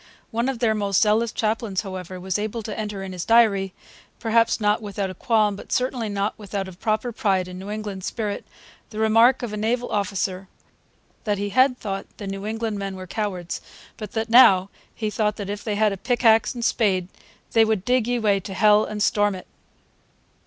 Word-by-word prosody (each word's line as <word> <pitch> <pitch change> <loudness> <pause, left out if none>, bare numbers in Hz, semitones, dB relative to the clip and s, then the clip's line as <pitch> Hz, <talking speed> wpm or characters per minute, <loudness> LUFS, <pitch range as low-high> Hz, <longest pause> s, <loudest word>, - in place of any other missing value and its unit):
One 235 +3 0
of 270 - -2
their 230 -2 +2
most 200 -2 +1
zealous 220 +2 +2
chaplains, 215 -3 -1
however, 185 -2 -7
was 190 +2 -2
able 215 +2 -3
to 215 - -5
enter 210 -3 -4
in 190 - -6
his 180 -2 -4
diary, 210 -5 +4 0.5
perhaps 230 0 +2
not 210 0 +2
without 200 -2 -3
a - - -7
qualm, 215 -1 +1
but - - -11
certainly 250 -3 0
not 200 +1 -1
without 200 -2 -4
a - - -8
proper 215 +6 -1
pride 195 -5 0
in 180 0 -8
New 195 +2 -8
England 210 -3 -5
spirit, 210 -1 -3 0.5
the 215 - -10
remark 225 +4 +4
of 225 -3 -4
a - - -3
naval 235 +3 -1
officer 195 -1 -2 0.8
'that 205 -2 0
he 205 +1 -2
had 255 +4 +3
thought 195 -4 -5
the 205 - -7
New 195 +1 -5
England 220 -1 -3
men 195 -1 -4
were 185 0 -7
cowards 185 -3 -4 0.3
But 215 -3 -8
that 225 0 -1
Now 200 -5 +6 0.2
he 215 -2 -2
thought 210 0 0
that 200 -1 -5
if 205 0 -6
they 210 -2 -2
had 215 0 +3
a - - -5
Pick 240 +6 -1
ax 225 +2 +5
and 235 -1 -3
Spade 190 -8 +1 0.4
they 225 - +5
would 220 -3 0
digg 250 -1 +2
ye 245 0 +1
way 210 -4 +2
to 190 0 -8
Hell 210 +1 +5
and 210 -1 -2
storm 205 -2 +2
it.' 185 - -9
210 Hz, 205 wpm, -23 LUFS, 195-225 Hz, 0.8 s, Now